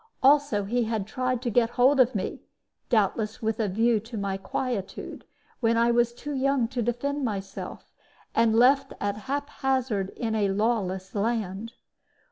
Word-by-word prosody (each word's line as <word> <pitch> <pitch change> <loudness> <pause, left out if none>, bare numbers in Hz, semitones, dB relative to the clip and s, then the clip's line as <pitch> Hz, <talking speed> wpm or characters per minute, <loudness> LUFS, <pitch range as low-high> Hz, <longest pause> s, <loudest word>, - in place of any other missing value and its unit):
Also 280 -6 +4
he 235 +4 0
had 220 -3 -2
tried 255 +2 -2
to 240 - -1
get 230 +1 +3
hold 265 +3 +5
of 255 0 +4
me - - -3 0.5
doubtless 215 0 +1
with 220 0 -2
a 220 - +1
view 225 +4 +2
to 225 +2 -8
my 200 -1 -2
quietude 195 +1 -4 0.4
when 230 -2 +2
I 235 +1 +4
was 240 0 +3
too 290 +5 -6
young 270 -2 +1
to 250 -1 -2
defend 270 +5 -1
myself, 195 -4 -5 0.4
and 225 -1 +3
left 260 +4 +4
at 205 0 -1
haphazard 265 -7 -1
in 225 -3 -2
a 210 -2 +1
lawless 195 -3 -1
land. 220 0 -2
230 Hz, 155 wpm, -26 LUFS, 210-255 Hz, 0.5 s, hold